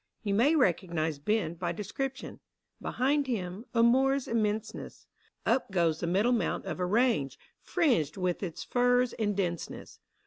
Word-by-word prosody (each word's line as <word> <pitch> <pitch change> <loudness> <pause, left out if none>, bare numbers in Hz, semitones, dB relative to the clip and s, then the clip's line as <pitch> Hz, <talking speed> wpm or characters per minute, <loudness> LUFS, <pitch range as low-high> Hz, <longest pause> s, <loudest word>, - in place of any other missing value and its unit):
You 205 -2 -1
may 260 +10 +4
recognise 170 - +1
Ben 210 +1 0
by 170 0 -3
description; 260 - -5 0.4
Behind 280 +2 0
him 200 -2 -3
— - - -42
a 230 - +5
moor's 265 +3 +3
immenseness: 220 -1 -2 0.4
Up 265 - +1
goes 170 -4 +1
the 170 - -2
middle 200 +8 +2
mount 240 - 0
of - - -4
a 180 - +1
range, 210 - +1 0.2
Fringed 240 - +1
with 180 -2 -1
its 175 -5 -5
firs 245 0 +2
in 210 -2 -1
denseness. 175 -4 -4
210 Hz, 150 wpm, -29 LUFS, 175-245 Hz, 0.4 s, a